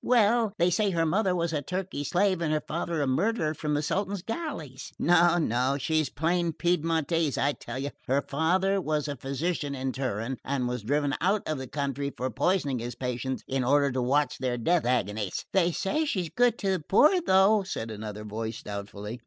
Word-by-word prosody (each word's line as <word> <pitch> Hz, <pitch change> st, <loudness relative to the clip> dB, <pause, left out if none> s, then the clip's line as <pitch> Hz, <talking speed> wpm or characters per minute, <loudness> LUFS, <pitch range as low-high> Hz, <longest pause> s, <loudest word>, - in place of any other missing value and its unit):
"Well, 230 Hz, -2 st, +3 dB
they 175 Hz, +1 st, +3 dB
say 205 Hz, +4 st, +2 dB
her 165 Hz, -3 st, +1 dB
mother 185 Hz, +3 st, +1 dB
was 170 Hz, -1 st, -1 dB
a 150 Hz, -, 0 dB
Turkey 180 Hz, -1 st, -4 dB
slave 185 Hz, +3 st, +1 dB
and 160 Hz, -2 st, 0 dB
her 155 Hz, -1 st, 0 dB
father 165 Hz, -1 st, -1 dB
a -, -, +1 dB
murderer 155 Hz, -, +1 dB
from 150 Hz, -1 st, -2 dB
the 145 Hz, -, 0 dB
Sultan's 195 Hz, +3 st, -2 dB
galleys." 215 Hz, -, -5 dB
"No, 175 Hz, 0 st, +4 dB
no, 130 Hz, -3 st, +1 dB
she's 155 Hz, 0 st, 0 dB
plain 170 Hz, +2 st, 0 dB
Piedmontese, 165 Hz, -3 st, 0 dB
I 140 Hz, -, +2 dB
tell 135 Hz, -, -7 dB
you. 140 Hz, +2 st, -3 dB, 0.2 s
Her 135 Hz, +2 st, +2 dB
father 185 Hz, +6 st, +1 dB
was 150 Hz, -2 st, -1 dB
a 145 Hz, -, -3 dB
physician 140 Hz, +3 st, -2 dB
in 130 Hz, 0 st, -2 dB
Turin, 125 Hz, -1 st, -3 dB
and 135 Hz, -2 st, -1 dB
was 125 Hz, -1 st, -3 dB
driven 145 Hz, +5 st, 0 dB
out 195 Hz, +4 st, +1 dB
of 155 Hz, -3 st, -2 dB
the 130 Hz, -, -6 dB
country 140 Hz, 0 st, -2 dB
for 130 Hz, +1 st, -2 dB
poisoning 145 Hz, -, +1 dB
his 120 Hz, +1 st, -5 dB
patients 125 Hz, +1 st, -3 dB
in 135 Hz, -1 st, 0 dB
order 140 Hz, +2 st, +3 dB
to 130 Hz, 0 st, -1 dB
watch 145 Hz, +4 st, +1 dB
their 125 Hz, -2 st, -1 dB
death 165 Hz, +4 st, +1 dB
agonies." 105 Hz, -5 st, -1 dB
"They 180 Hz, -2 st, +3 dB
say 250 Hz, -, 0 dB
she's 185 Hz, -, -1 dB
good 245 Hz, +3 st, +2 dB
to 195 Hz, -2 st, 0 dB
the 190 Hz, -, +1 dB
poor, 300 Hz, -, +4 dB
though," 200 Hz, -, +4 dB
said 115 Hz, -12 st, -5 dB
another 105 Hz, 0 st, -6 dB
voice 110 Hz, +1 st, -5 dB
doubtfully. 100 Hz, +2 st, -6 dB
150 Hz, 195 wpm, -28 LUFS, 130-180 Hz, 0.2 s, No